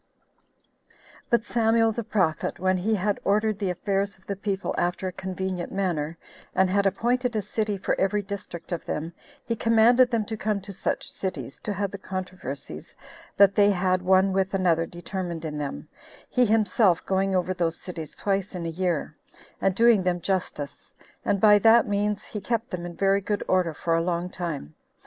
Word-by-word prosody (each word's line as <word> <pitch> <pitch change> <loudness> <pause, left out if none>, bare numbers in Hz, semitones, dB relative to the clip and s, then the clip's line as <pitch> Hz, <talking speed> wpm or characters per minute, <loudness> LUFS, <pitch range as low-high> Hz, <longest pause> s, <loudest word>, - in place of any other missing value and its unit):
1. - - -29 0.3
But 235 -2 +2
Samuel 225 -1 +3
the 235 +2 -3
prophet, 185 -7 0
when 185 +1 +1
he 210 +5 +1
had 205 +1 0
ordered 210 +1 +1
the 200 -3 -1
affairs 195 +2 -1
of 190 - -28
the 200 - -3
people 195 0 -2
after 175 +2 -1
a - - -2
convenient 185 -1 -4
manner, 170 -5 -1 0.4
and 185 0 +3
had 200 0 +3
appointed 245 +4 0
a 215 - +1
city 210 0 -1
for 190 - -1
every 205 +2 +1
district 190 -3 -7
of 170 - -2
them, 160 +3 -4 0.3
he 230 - -1
commanded 230 +3 +5
them 230 -3 0
to 220 - -4
come 210 -1 -1
to 200 +1 -9
such - - -3
cities, 145 -9 -5
to 210 - -4
have 200 0 -2
the 200 - -7
controversies 185 -8 -6 0.4
that 200 -1 +7
they 205 0 +5
had 185 -1 +1
one 190 +1 +4
with 195 0 0
another 170 -3 +2
determined 175 -1 -5
in 150 -1 -4
them, 140 - -5 0.4
he 250 -1 +3
himself 210 -4 +3
going 190 0 +1
over 185 0 +1
those 170 -2 -1
cities 165 -5 -7
twice 195 -1 -1
in 175 -2 -4
a - - -1
year, 170 -2 -2 0.5
and 190 -1 +2
doing 230 -2 +5
them 180 -1 0
justice; 175 -6 -3 0.3
and 200 - +1
by 210 0 +7
that 225 +2 +6
means 205 0 0
he 210 - -6
kept 230 +2 -2
them 175 -1 -4
in 170 - -9
very 195 +1 +2
good 205 +1 -2
order 185 -3 +2
for 165 +2 -2
a 165 - +2
long 175 +1 -2
time. 165 - -5
190 Hz, 185 wpm, -26 LUFS, 175-210 Hz, 0.5 s, that